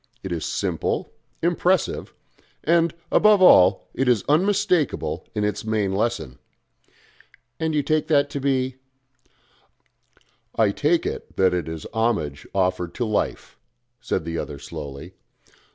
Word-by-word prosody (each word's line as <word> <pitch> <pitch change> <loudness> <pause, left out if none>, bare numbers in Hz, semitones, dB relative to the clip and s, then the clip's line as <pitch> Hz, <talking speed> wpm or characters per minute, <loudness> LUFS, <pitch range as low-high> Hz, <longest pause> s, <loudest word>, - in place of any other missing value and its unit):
It 95 - -5
is 85 -2 -2
simple, - - -2 0.3
impressive, 175 0 +1 0.5
and, 170 0 +3 0.2
above 210 -1 +5
all, 95 - +6
it 135 +1 -1
is 120 -5 +2
unmistakable 185 0 +1
in 105 - 0
its 105 0 -1
main 110 -3 0
lesson 105 - -2 0.6
" 125 +2 -31
"And 160 -1 -1
that - - +2
you 145 - +1
take 155 +1 0
to 145 -2 +2
be 130 -1 0 0.9
?" - - -38
"I 110 -3 +3
take 160 +9 +1
it - - -5
that 95 -1 +3
it 90 -2 -2
is 80 -1 -6
homage 105 -12 -1
offered 90 -3 -1
to 120 - -1
Life," 110 -2 -2 0.4
said 80 - -2
the 85 0 -3
other 75 - -5
slowly. 75 +3 -8
115 Hz, 135 wpm, -23 LUFS, 90-155 Hz, 0.9 s, all